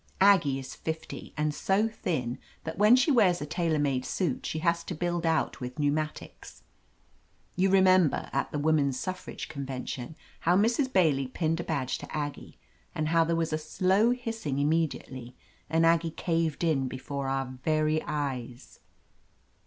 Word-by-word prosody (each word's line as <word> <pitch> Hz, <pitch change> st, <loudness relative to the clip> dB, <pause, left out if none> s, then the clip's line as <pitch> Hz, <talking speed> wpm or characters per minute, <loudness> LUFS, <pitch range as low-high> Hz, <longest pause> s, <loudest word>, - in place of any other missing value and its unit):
Aggie 180 Hz, -9 st, +5 dB
is 130 Hz, -1 st, -7 dB
fifty, 160 Hz, 0 st, -6 dB
and 150 Hz, 0 st, 0 dB
so 195 Hz, +7 st, +1 dB
thin 135 Hz, -, -3 dB, 0.2 s
that 160 Hz, +3 st, -6 dB
when 210 Hz, +4 st, +7 dB
she 260 Hz, +4 st, +3 dB
wears 195 Hz, -9 st, +4 dB
a -, -, -4 dB
tailor 160 Hz, +1 st, 0 dB
made 140 Hz, -3 st, 0 dB
suit 165 Hz, -5 st, -2 dB
she -, -, -3 dB
has 170 Hz, +1 st, +1 dB
to 180 Hz, -, -4 dB
build 175 Hz, +1 st, -1 dB
out 160 Hz, -3 st, 0 dB
with 125 Hz, +3 st, -6 dB
pneumatics. 150 Hz, +1 st, -3 dB, 0.9 s
You 190 Hz, +2 st, +2 dB
remember, 185 Hz, -4 st, +4 dB
at 140 Hz, -, -1 dB
the -, -, -2 dB
Woman's 145 Hz, -3 st, +2 dB
Suffrage 185 Hz, 0 st, -5 dB
Convention, 135 Hz, 0 st, -5 dB, 0.2 s
how 175 Hz, +2 st, +3 dB
Mrs. 235 Hz, +6 st, +2 dB
Bailey 150 Hz, -, +3 dB
pinned 160 Hz, +4 st, -1 dB
a -, -, -2 dB
badge 140 Hz, -6 st, -2 dB
to -, -, -10 dB
Aggie, 145 Hz, -1 st, -5 dB, 0.4 s
and 155 Hz, 0 st, -1 dB
how 165 Hz, 0 st, +4 dB
there 165 Hz, +1 st, 0 dB
was 165 Hz, -1 st, -1 dB
a 155 Hz, -, 0 dB
slow 190 Hz, +7 st, +2 dB
hissing 225 Hz, -, -2 dB
immediately, 140 Hz, -5 st, -1 dB, 0.3 s
and 165 Hz, +1 st, +3 dB
Aggie 165 Hz, 0 st, +3 dB
caved 165 Hz, -1 st, -1 dB
in 145 Hz, -6 st, +1 dB
be 130 Hz, -, -5 dB
fore 140 Hz, +1 st, -4 dB
our 135 Hz, -1 st, -3 dB
very 155 Hz, 0 st, +1 dB
eyes 130 Hz, -5 st, -5 dB
160 Hz, 160 wpm, -28 LUFS, 140-175 Hz, 0.9 s, when